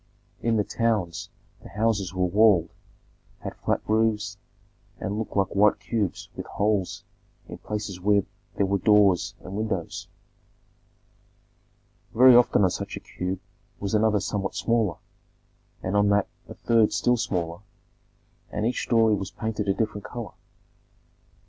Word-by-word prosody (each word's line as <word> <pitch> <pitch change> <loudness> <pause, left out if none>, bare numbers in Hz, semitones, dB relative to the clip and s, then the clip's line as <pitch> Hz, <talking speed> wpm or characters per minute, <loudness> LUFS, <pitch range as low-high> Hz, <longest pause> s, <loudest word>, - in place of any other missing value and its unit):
In 115 -1 +1
the 105 - +2
towns 105 -7 -1 0.3
the - - -12
houses 105 -4 0
were 95 -1 0
walled, 95 -2 +4 0.7
had - - -5
flat - - -1
roofs, 105 -2 +1 0.6
and 105 +2 -3
looked 110 - -4
like 95 -1 +1
white 105 +1 +4
cubes 105 -2 -2
with - - -6
holes 100 -3 -1 0.4
in - - -9
places 105 -3 -5
where 100 +1 +3 0.3
there 100 - +2
were 100 +1 0
doors 100 -3 +4
and 95 - -9
windows. 100 -5 -3 2.1
Very 125 +1 +8
often 120 -4 +5
on 95 - +3
such - - -5
a - - -6
cube 90 0 -5 0.4
was 100 0 -3
another 105 -1 +3
somewhat 100 0 -3
smaller, 115 -7 +1 0.9
and 95 +2 -2
on 105 0 +4
that 100 -1 +2 0.2
a - - -8
third 115 -2 +3
still 125 - +2
smaller, 85 -7 -2 0.9
and 105 - -2
each 120 - 0
story 115 -2 +3
was 95 -2 -2
painted 110 -2 -4
a 100 - +3
different 105 -2 -2
color. 120 -3 -7
105 Hz, 140 wpm, -25 LUFS, 95-110 Hz, 2.1 s, Very